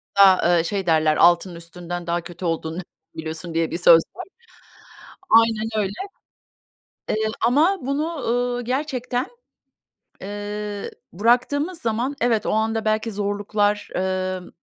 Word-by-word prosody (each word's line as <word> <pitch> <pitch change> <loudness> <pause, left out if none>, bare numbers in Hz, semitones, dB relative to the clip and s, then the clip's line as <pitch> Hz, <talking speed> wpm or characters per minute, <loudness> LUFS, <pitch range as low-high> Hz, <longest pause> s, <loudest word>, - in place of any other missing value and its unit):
A 190 -3 +6
ı 165 - 0
şey 195 +2 -2
derler 155 -2 +3
altının 175 +1 +4
üstünden 175 +1 -7
daha 170 0 0
kötü 175 +2 -9
olduğunu 165 +1 -2 0.3
biliyorsun, 160 +2 -6
diye 165 0 0
bir 170 - -2
söz 170 -2 +7
var. 370 - -7 1.0
Aynen 225 -1 +4
öyle. 200 -2 0 1.2
Eee, - - +1 0.3
ama 315 +11 +3
bunu, 300 +5 -2
ııı, 245 +1 0
gerçekten, 255 -1 -2 1.0
eee, 205 0 -5 0.2
bıraktığımız 255 - +1
zaman 235 +4 -1
evet, 230 -2 +1
o - - 0
anda 220 +1 0
belki 215 +1 0
zorluklar, 205 0 -1
emm, 185 0 -2
205 Hz, 125 wpm, -22 LUFS, 175-240 Hz, 1.2 s, söz